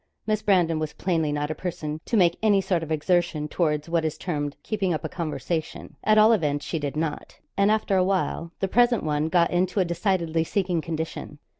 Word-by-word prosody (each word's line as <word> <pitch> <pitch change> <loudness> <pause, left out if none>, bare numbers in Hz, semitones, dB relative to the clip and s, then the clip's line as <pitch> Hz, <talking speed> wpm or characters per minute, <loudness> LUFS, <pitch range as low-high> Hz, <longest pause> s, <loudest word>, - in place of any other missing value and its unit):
Miss 215 0 0
Brandon 175 -6 +2
was 155 -1 -3
plainly 165 -5 0
not 150 +1 -2
a - - 0
person 155 -2 -5
to 230 - 0
make 175 -3 +4
any 210 -3 +4
sort 185 -3 0
of 160 -1 -6
exertion 160 -1 +1
towards 150 -2 -1
what 165 -1 0
is 155 -1 -2
termed 145 -5 -3
keeping 195 -6 -1
up - - -5
a - - -3
conversation; 165 -1 -4
at 215 0 +4
all 215 +2 +7
events 150 -8 0
she 165 - -2
did 145 -1 -4
not, 155 -1 -4 0.2
and 200 +1 +3
after 215 -2 +2
a 185 - +4
while 185 -3 -1
the 195 - +1
present 240 +3 +3
one 150 0 0
got 170 0 +3
into 185 +2 +1
a 185 - +3
decidedly 170 -2 0
sinking 180 -1 -1
condition. 160 -2 -5
170 Hz, 205 wpm, -25 LUFS, 155-190 Hz, 0.2 s, all